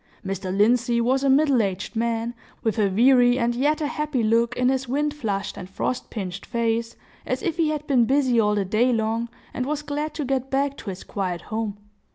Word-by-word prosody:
Mr. 190 Hz, -1 st, -3 dB
Lindsey 235 Hz, +4 st, +3 dB
was 260 Hz, +3 st, +2 dB
a 275 Hz, -, +3 dB
middle 275 Hz, -2 st, +4 dB
aged 195 Hz, +2 st, -3 dB
man, 230 Hz, +1 st, -1 dB, 0.3 s
with 220 Hz, -1 st, 0 dB
a 205 Hz, -2 st, +3 dB
weary 245 Hz, +4 st, +5 dB
and 240 Hz, -1 st, +1 dB
yet 290 Hz, +6 st, +1 dB
a -, -, +1 dB
happy 295 Hz, -4 st, -1 dB
look 230 Hz, +2 st, +2 dB
in 250 Hz, 0 st, +3 dB
his 265 Hz, 0 st, 0 dB
wind 290 Hz, +3 st, 0 dB
flushed 205 Hz, -9 st, -3 dB
and 180 Hz, -, -8 dB
frost 245 Hz, +5 st, -3 dB
pinched 195 Hz, -3 st, -5 dB
face, 230 Hz, 0 st, -1 dB, 0.3 s
as -, -, -3 dB
if 340 Hz, -4 st, -1 dB
he 325 Hz, -2 st, +2 dB
had 305 Hz, -1 st, -3 dB
been 255 Hz, -5 st, +3 dB
busy 260 Hz, -2 st, +3 dB
all 210 Hz, -1 st, +3 dB
the 200 Hz, -2 st, 0 dB
day 220 Hz, +6 st, +2 dB
long, 225 Hz, 0 st, 0 dB, 0.2 s
and 255 Hz, +1 st, -2 dB
was 300 Hz, 0 st, -2 dB
glad 300 Hz, +1 st, -3 dB
to 300 Hz, -, -2 dB
get 265 Hz, 0 st, -1 dB
back 275 Hz, +1 st, 0 dB
to 205 Hz, -, -7 dB
his 185 Hz, 0 st, -6 dB
quiet 185 Hz, -4 st, -3 dB
home. 215 Hz, -1 st, -4 dB
240 Hz, 210 wpm, -24 LUFS, 220-270 Hz, 0.3 s, weary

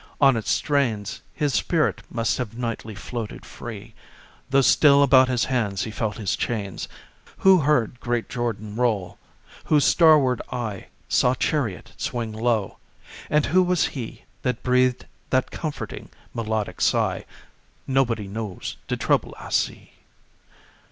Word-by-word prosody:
On 135 Hz, -3 st, +6 dB
its 110 Hz, -, -3 dB
strains 115 Hz, -9 st, 0 dB
His 145 Hz, -3 st, -1 dB
spirit 165 Hz, -4 st, +1 dB
must 115 Hz, 0 st, -1 dB
have 115 Hz, -2 st, -4 dB
nightly 115 Hz, -3 st, -4 dB
floated 115 Hz, +2 st, -6 dB
free, 110 Hz, -1 st, -9 dB, 0.6 s
Though 135 Hz, 0 st, +4 dB
still 140 Hz, +6 st, +6 dB
about 130 Hz, -1 st, +6 dB
his 125 Hz, -2 st, +1 dB
hands 110 Hz, -7 st, -1 dB
he 110 Hz, -, -5 dB
felt 110 Hz, -1 st, -3 dB
his 100 Hz, -3 st, -1 dB
chains. 100 Hz, -5 st, -3 dB, 0.5 s
Who 190 Hz, -1 st, +6 dB
heard 130 Hz, -6 st, +1 dB
great 120 Hz, -2 st, -1 dB
"Jordan 110 Hz, -4 st, -3 dB
roll"? 110 Hz, -7 st, 0 dB, 0.5 s
Whose 150 Hz, -2 st, +3 dB
starward 150 Hz, -7 st, +5 dB
eye 115 Hz, -6 st, -4 dB, 0.2 s
Saw 125 Hz, +1 st, +3 dB
chariot 125 Hz, -, -1 dB
"swing 115 Hz, -2 st, -3 dB
low"? 110 Hz, -3 st, -1 dB, 0.5 s
And 150 Hz, -1 st, +3 dB
who 185 Hz, +5 st, +4 dB
was 180 Hz, -1 st, +2 dB
he 120 Hz, -5 st, -7 dB, 0.2 s
That 125 Hz, -3 st, -2 dB
breathed 125 Hz, 0 st, +2 dB, 0.2 s
that 130 Hz, 0 st, +1 dB
comforting, 155 Hz, -3 st, -5 dB, 0.2 s
melodic 110 Hz, -2 st, -3 dB
sigh, -, -, +1 dB, 0.6 s
"Nobody 120 Hz, -6 st, +1 dB
knows 105 Hz, -1 st, -5 dB
de -, -, -1 dB
trouble -, -, 0 dB
I -, -, -9 dB
see"? -, -, -1 dB
120 Hz, 135 wpm, -24 LUFS, 110-135 Hz, 0.6 s, On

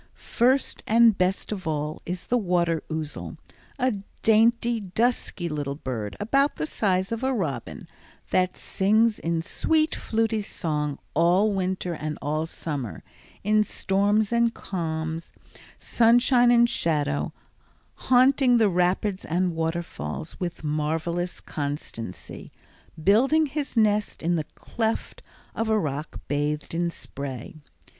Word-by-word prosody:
First 255 Hz, +3 st, +1 dB
and 230 Hz, -1 st, +6 dB
best 185 Hz, +2 st, 0 dB
of 190 Hz, -5 st, -4 dB
all 150 Hz, 0 st, -2 dB
is 180 Hz, +1 st, -4 dB
the 245 Hz, -, +1 dB
water 175 Hz, -4 st, +1 dB
ouzel, 155 Hz, -2 st, -4 dB, 0.4 s
a 255 Hz, -5 st, +1 dB, 0.3 s
dainty, 230 Hz, +1 st, +4 dB
dusky 205 Hz, -2 st, -1 dB
little 145 Hz, -3 st, -3 dB
bird 115 Hz, -8 st, -5 dB
about 275 Hz, +7 st, +2 dB
the 150 Hz, -, -2 dB
size 190 Hz, +2 st, 0 dB
of 230 Hz, +2 st, -3 dB
a 265 Hz, -, +2 dB
robin, 155 Hz, -, -3 dB, 0.4 s
that 185 Hz, 0 st, +1 dB
sings 215 Hz, +3 st, +2 dB
in 165 Hz, 0 st, -1 dB
sweet 315 Hz, -, +1 dB
fluty 225 Hz, -1 st, 0 dB
song 150 Hz, -7 st, -2 dB, 0.2 s
all 180 Hz, +6 st, +3 dB
winter 185 Hz, -2 st, -1 dB
and 155 Hz, -1 st, -4 dB
all 155 Hz, +2 st, -1 dB
summer, 145 Hz, -8 st, -5 dB, 0.4 s
in 215 Hz, +1 st, +4 dB
storms 205 Hz, +2 st, +1 dB
and 235 Hz, 0 st, +2 dB
calms, 160 Hz, -2 st, -4 dB, 0.4 s
sunshine 240 Hz, +1 st, +4 dB
and 240 Hz, 0 st, +6 dB
shadow, 145 Hz, -, 0 dB, 0.6 s
haunting 255 Hz, 0 st, +4 dB
the 220 Hz, -3 st, +4 dB
rapids 185 Hz, +2 st, +1 dB
and 175 Hz, +1 st, 0 dB
waterfalls 165 Hz, 0 st, -4 dB
with 175 Hz, -2 st, -4 dB
marvelous 160 Hz, +4 st, -2 dB
constancy, 140 Hz, -, -6 dB, 0.5 s
building 270 Hz, -, +4 dB
his 285 Hz, -3 st, -4 dB
nest 210 Hz, -4 st, +2 dB
in 175 Hz, +1 st, +2 dB
the 155 Hz, -2 st, -1 dB
cleft 225 Hz, -1 st, -3 dB, 0.3 s
of 225 Hz, 0 st, -2 dB
a 220 Hz, -, +3 dB
rock 150 Hz, -4 st, -3 dB
bathed 145 Hz, +1 st, -2 dB
in 170 Hz, +1 st, 0 dB
spray. 140 Hz, 0 st, -7 dB
185 Hz, 125 wpm, -25 LUFS, 160-225 Hz, 0.6 s, and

